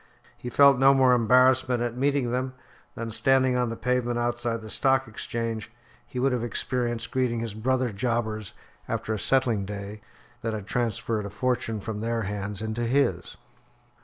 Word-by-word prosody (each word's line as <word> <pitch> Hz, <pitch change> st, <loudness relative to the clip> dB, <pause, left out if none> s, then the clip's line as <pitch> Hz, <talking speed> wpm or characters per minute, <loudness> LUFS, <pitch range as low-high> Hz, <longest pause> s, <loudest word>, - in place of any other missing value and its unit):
He 125 Hz, -, -7 dB
felt 140 Hz, +1 st, +6 dB
no 135 Hz, +1 st, +6 dB
more 130 Hz, -1 st, +5 dB
embarrassment 125 Hz, +1 st, +4 dB
at 120 Hz, -1 st, -3 dB
meeting 135 Hz, -1 st, +1 dB
them 130 Hz, +1 st, -2 dB, 0.4 s
than, 115 Hz, 0 st, -5 dB
standing 130 Hz, +2 st, +3 dB
on 125 Hz, -1 st, +1 dB
the 115 Hz, -, -4 dB
pavement 125 Hz, -1 st, 0 dB
outside 120 Hz, -1 st, -1 dB
the 110 Hz, -, -9 dB
Stock 135 Hz, -1 st, +2 dB
Exchange, 115 Hz, 0 st, -4 dB, 0.4 s
he -, -, -9 dB
would 135 Hz, +2 st, +2 dB
have 125 Hz, -2 st, -1 dB
experienced 120 Hz, -1 st, -2 dB
greeting 125 Hz, -3 st, 0 dB
his 115 Hz, -2 st, -4 dB
brother 125 Hz, +2 st, 0 dB
jobbers 110 Hz, -2 st, -2 dB, 0.3 s
after 110 Hz, -, -2 dB
a 110 Hz, -, -3 dB
settling 120 Hz, -6 st, +1 dB
day 100 Hz, +1 st, -7 dB, 0.4 s
that 115 Hz, -2 st, -2 dB
had 105 Hz, -3 st, -6 dB
transferred 115 Hz, -2 st, -1 dB
a -, -, -7 dB
fortune 115 Hz, 0 st, -1 dB
from 105 Hz, 0 st, -5 dB
their 115 Hz, 0 st, -1 dB
hands 105 Hz, 0 st, -4 dB
into 110 Hz, +2 st, -2 dB
his. 115 Hz, -9 st, 0 dB
120 Hz, 165 wpm, -26 LUFS, 110-130 Hz, 0.4 s, felt